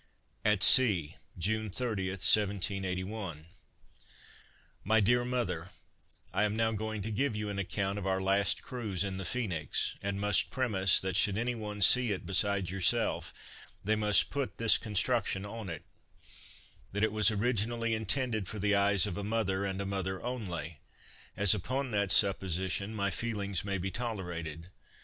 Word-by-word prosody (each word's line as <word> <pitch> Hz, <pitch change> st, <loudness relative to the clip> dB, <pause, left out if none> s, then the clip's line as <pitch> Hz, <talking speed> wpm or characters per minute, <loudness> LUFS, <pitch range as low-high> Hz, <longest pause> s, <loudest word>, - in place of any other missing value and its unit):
At 105 Hz, -2 st, +3 dB
Sea, 100 Hz, -, +7 dB, 0.2 s
June 110 Hz, +5 st, -1 dB
30, 105 Hz, -3 st, -2 dB
1781. 95 Hz, -2 st, 0 dB, 1.4 s
MY 110 Hz, +3 st, +3 dB
DEAR 120 Hz, +4 st, +2 dB
MOTHER, 120 Hz, -9 st, -3 dB, 0.6 s
I -, -, +1 dB
am 105 Hz, 0 st, 0 dB
now 110 Hz, 0 st, +1 dB
going 110 Hz, -1 st, -4 dB
to 110 Hz, -, -4 dB
give 115 Hz, +2 st, -1 dB
you 105 Hz, 0 st, -4 dB
an 100 Hz, -1 st, -4 dB
account 100 Hz, +1 st, -2 dB
of 95 Hz, -, -5 dB
our 95 Hz, 0 st, 0 dB
last 95 Hz, +1 st, +1 dB
cruise 110 Hz, -8 st, -3 dB
in 95 Hz, -1 st, -4 dB
the 95 Hz, -, -5 dB
Phoenix; 90 Hz, -8 st, -2 dB
and 100 Hz, 0 st, -3 dB
must 105 Hz, 0 st, +1 dB
premise, 100 Hz, -8 st, +2 dB
that 95 Hz, -1 st, -3 dB
should 100 Hz, 0 st, +2 dB
any 120 Hz, +2 st, -1 dB
one 105 Hz, -3 st, -7 dB
see 125 Hz, +4 st, +6 dB
it 95 Hz, -, -4 dB
besides 95 Hz, -1 st, 0 dB
yourself, 95 Hz, -1 st, 0 dB, 0.5 s
they 110 Hz, +2 st, +1 dB
must 105 Hz, -2 st, +2 dB
put 140 Hz, -2 st, -3 dB
this 115 Hz, -1 st, +3 dB
construction 105 Hz, -1 st, -1 dB
on 105 Hz, -1 st, -7 dB
it 80 Hz, -3 st, -7 dB, 1.1 s
that 105 Hz, +1 st, -1 dB
it 110 Hz, -, +2 dB
was 110 Hz, 0 st, +4 dB
originally 115 Hz, +1 st, -1 dB
intended 110 Hz, -1 st, 0 dB
for 110 Hz, -, -6 dB
the 105 Hz, 0 st, +1 dB
eyes 100 Hz, -2 st, +4 dB
of 100 Hz, -3 st, -5 dB
a 100 Hz, -, -4 dB
mother, 100 Hz, -2 st, -1 dB
and 95 Hz, -1 st, -4 dB
a 100 Hz, -, -3 dB
mother 95 Hz, -1 st, -3 dB
only 90 Hz, -, -5 dB, 0.6 s
as, 105 Hz, -1 st, +5 dB
upon 130 Hz, +6 st, -3 dB
that 100 Hz, -3 st, 0 dB
supposition, 95 Hz, +1 st, +2 dB
my 100 Hz, -1 st, -1 dB
feelings 100 Hz, -5 st, -3 dB
may 100 Hz, 0 st, -2 dB
be 95 Hz, +1 st, -4 dB
tolerated. 90 Hz, -8 st, -5 dB
100 Hz, 160 wpm, -30 LUFS, 95-110 Hz, 1.4 s, Sea